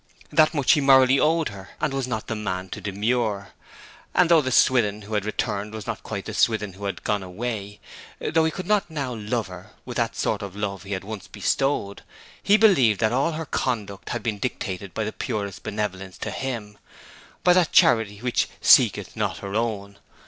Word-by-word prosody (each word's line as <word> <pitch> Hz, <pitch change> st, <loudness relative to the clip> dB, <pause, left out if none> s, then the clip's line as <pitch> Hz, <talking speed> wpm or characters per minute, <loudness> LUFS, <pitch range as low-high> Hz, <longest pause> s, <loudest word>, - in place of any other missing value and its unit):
That 155 Hz, +2 st, +4 dB
much 145 Hz, -3 st, +3 dB
he 150 Hz, -, +4 dB
morally 135 Hz, -1 st, +6 dB
owed 160 Hz, +1 st, +2 dB
her, 95 Hz, -2 st, -11 dB
and 140 Hz, -, -1 dB
was 135 Hz, -2 st, -2 dB
not 110 Hz, -4 st, -3 dB
the -, -, -3 dB
man 95 Hz, -3 st, -4 dB
to 105 Hz, -, -7 dB
demur. 105 Hz, +1 st, -1 dB, 0.7 s
And 175 Hz, -1 st, +4 dB
though 165 Hz, -2 st, +7 dB
the 130 Hz, -2 st, -2 dB
Swithin 105 Hz, -5 st, +3 dB
who 105 Hz, +2 st, -8 dB
had 105 Hz, -1 st, 0 dB
returned 105 Hz, 0 st, -3 dB
was 110 Hz, -3 st, -7 dB
not -, -, -4 dB
quite -, -, -6 dB
the -, -, -6 dB
Swithin 105 Hz, -4 st, +1 dB
who 100 Hz, +2 st, -8 dB
had 100 Hz, -, -4 dB
gone 105 Hz, -1 st, 0 dB
away, 105 Hz, +2 st, -5 dB, 0.4 s
though 160 Hz, 0 st, +1 dB
he 160 Hz, -, +2 dB
could 185 Hz, +2 st, -6 dB
not 205 Hz, -2 st, +1 dB
now 140 Hz, -5 st, -3 dB
love 110 Hz, +1 st, -2 dB
her 90 Hz, +2 st, -11 dB
with -, -, -6 dB
the -, -, +1 dB
sort -, -, -1 dB
of 100 Hz, -2 st, -7 dB
love 100 Hz, -2 st, -3 dB
he 100 Hz, +1 st, -6 dB
had 95 Hz, -, -3 dB
once 100 Hz, -1 st, -7 dB
bestowed; 100 Hz, 0 st, -1 dB, 0.4 s
he 205 Hz, -, +5 dB
believed 135 Hz, -, +4 dB
that 110 Hz, 0 st, +2 dB
all 140 Hz, +6 st, +1 dB
her 160 Hz, +1 st, -4 dB
conduct 105 Hz, -8 st, -3 dB
had 120 Hz, -2 st, -3 dB
been 105 Hz, -3 st, -2 dB
dictated 100 Hz, -5 st, -4 dB
by 110 Hz, -, -1 dB
the 110 Hz, -, -4 dB
purest 100 Hz, -2 st, -4 dB
benevolence 95 Hz, -3 st, -4 dB
to -, -, -4 dB
him, 110 Hz, -6 st, -5 dB, 0.6 s
by 180 Hz, -, +6 dB
that 180 Hz, -3 st, +3 dB
charity 110 Hz, -, +4 dB
which 125 Hz, -1 st, 0 dB
'seeketh -, -, +4 dB
not -, -, -1 dB
her 100 Hz, 0 st, -7 dB
own.' 100 Hz, -3 st, -2 dB
110 Hz, 200 wpm, -24 LUFS, 100-135 Hz, 0.7 s, though